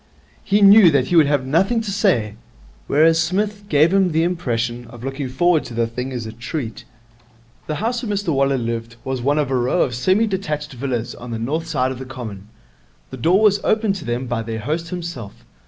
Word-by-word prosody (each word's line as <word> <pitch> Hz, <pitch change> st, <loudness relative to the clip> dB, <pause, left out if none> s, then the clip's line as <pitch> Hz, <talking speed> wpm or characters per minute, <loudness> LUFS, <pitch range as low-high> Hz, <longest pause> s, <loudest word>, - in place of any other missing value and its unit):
He 205 Hz, +1 st, +2 dB
knew 200 Hz, -2 st, +8 dB
that 140 Hz, -4 st, +1 dB
he 175 Hz, -, +1 dB
would 160 Hz, -4 st, +6 dB
have 140 Hz, -2 st, +1 dB
nothing 190 Hz, -, +2 dB
to 215 Hz, -3 st, -4 dB
say. 185 Hz, -, +1 dB, 0.5 s
Whereas 160 Hz, +3 st, +4 dB
Psmith 200 Hz, +5 st, -1 dB
gave 155 Hz, +4 st, +4 dB
him 190 Hz, -4 st, +3 dB
the 160 Hz, +1 st, +2 dB
impression 120 Hz, -9 st, -2 dB
of 120 Hz, 0 st, -12 dB
looking 135 Hz, 0 st, -4 dB
forward 165 Hz, +5 st, +2 dB
to 120 Hz, -, -8 dB
the 115 Hz, 0 st, +1 dB
thing 125 Hz, +3 st, -5 dB
as 120 Hz, -3 st, -4 dB
a 110 Hz, -, -6 dB
treat. 120 Hz, 0 st, -6 dB, 0.8 s
The 155 Hz, -, -2 dB
house 235 Hz, +6 st, -2 dB
where 220 Hz, -, -3 dB
Mr 200 Hz, -5 st, -1 dB
Waller 135 Hz, 0 st, +2 dB
lived 115 Hz, -1 st, -4 dB
was 130 Hz, -2 st, -3 dB
one 145 Hz, +4 st, +1 dB
of 145 Hz, -3 st, 0 dB
a -, -, +1 dB
row 125 Hz, +8 st, +2 dB
of 125 Hz, -, -3 dB
semi 185 Hz, -, +2 dB
detached 155 Hz, -8 st, -3 dB
villas 125 Hz, -2 st, -3 dB
on 125 Hz, -, -10 dB
the 115 Hz, -, -3 dB
north 150 Hz, +9 st, -3 dB
side 130 Hz, -5 st, 0 dB
of 130 Hz, -, -7 dB
the 130 Hz, -, -7 dB
Common. 110 Hz, -7 st, -8 dB, 0.6 s
The 130 Hz, -, -7 dB
door 180 Hz, -, +3 dB
was 205 Hz, -1 st, +4 dB
opened 215 Hz, -2 st, +1 dB
to -, -, -9 dB
them 120 Hz, +2 st, -2 dB
by 120 Hz, -2 st, -2 dB
their 110 Hz, -1 st, -5 dB
host 160 Hz, +7 st, -3 dB
himself. 170 Hz, -, -7 dB
140 Hz, 215 wpm, -20 LUFS, 120-180 Hz, 0.8 s, knew